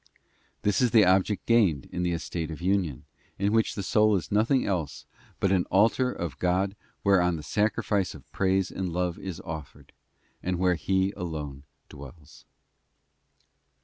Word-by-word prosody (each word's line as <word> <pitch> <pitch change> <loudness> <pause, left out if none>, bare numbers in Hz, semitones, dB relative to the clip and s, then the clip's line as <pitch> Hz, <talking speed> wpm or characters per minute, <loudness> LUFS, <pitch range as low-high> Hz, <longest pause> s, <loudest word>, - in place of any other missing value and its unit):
This 105 +4 +2
is 125 - +4
the 110 -3 +6
object 95 +2 +2
gained 100 - +3
in 90 - -3
the 90 0 0
estate 85 -1 -3
of 80 - -7
union, 90 -6 -1 0.3
in 100 +2 0
which 115 -1 +2
the 100 - -3
soul 105 +2 +3
is 90 -6 -3
nothing 115 +6 +2
else 90 -7 -3 0.3
but 95 - +1
an 95 -2 +2
altar 115 +6 +3
of 85 - -5
God 95 +2 +1 0.3
whereon 90 -3 +3
the 75 - -7
sacrifice 105 0 0
of 70 -3 -14
praise 95 +1 +1
and 95 -2 -3
love 90 0 -2
is 95 -4 -6
offered, 80 -3 -9 0.5
and 90 0 -2
where 90 0 +3
He 95 +4 0
alone 75 -5 -6 0.2
dwells. 70 +2 -13
95 Hz, 155 wpm, -27 LUFS, 85-100 Hz, 0.5 s, the